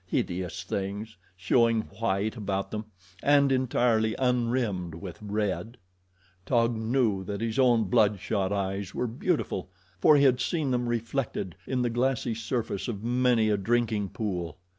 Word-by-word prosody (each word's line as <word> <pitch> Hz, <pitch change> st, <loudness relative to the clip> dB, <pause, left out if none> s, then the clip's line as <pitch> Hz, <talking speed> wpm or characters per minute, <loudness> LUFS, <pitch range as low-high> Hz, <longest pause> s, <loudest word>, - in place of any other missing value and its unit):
Hideous 90 Hz, 0 st, -2 dB
things, 100 Hz, +4 st, -4 dB, 0.2 s
showing 115 Hz, +4 st, +3 dB
white 105 Hz, 0 st, -2 dB
about 100 Hz, -3 st, -3 dB
them, 110 Hz, 0 st, -4 dB, 0.4 s
and 140 Hz, -1 st, +4 dB
entirely 120 Hz, -4 st, +2 dB
unrimmed 120 Hz, -9 st, 0 dB
with 90 Hz, 0 st, -8 dB
red. 105 Hz, +2 st, -2 dB, 0.7 s
Taug 115 Hz, 0 st, +2 dB
knew 110 Hz, -3 st, +1 dB
that 100 Hz, +1 st, -4 dB
his 115 Hz, +3 st, -2 dB
own 120 Hz, -3 st, +5 dB
blood 105 Hz, 0 st, +3 dB
shot 95 Hz, 0 st, -1 dB
eyes 100 Hz, -1 st, -2 dB
were -, -, 0 dB
beautiful, 120 Hz, -, -2 dB, 0.3 s
for 150 Hz, +9 st, +6 dB
he 140 Hz, -, +4 dB
had 130 Hz, -2 st, +4 dB
seen 155 Hz, -4 st, 0 dB
them 125 Hz, -1 st, 0 dB
reflected 115 Hz, -, -2 dB
in 125 Hz, -2 st, 0 dB
the 120 Hz, -, 0 dB
glassy 120 Hz, -1 st, 0 dB
surface 110 Hz, -2 st, -3 dB
of 110 Hz, -4 st, -4 dB
many 120 Hz, -2 st, +2 dB
a 105 Hz, -, +2 dB
drinking 110 Hz, -1 st, 0 dB
pool. 90 Hz, -7 st, -4 dB
110 Hz, 145 wpm, -28 LUFS, 100-125 Hz, 0.7 s, for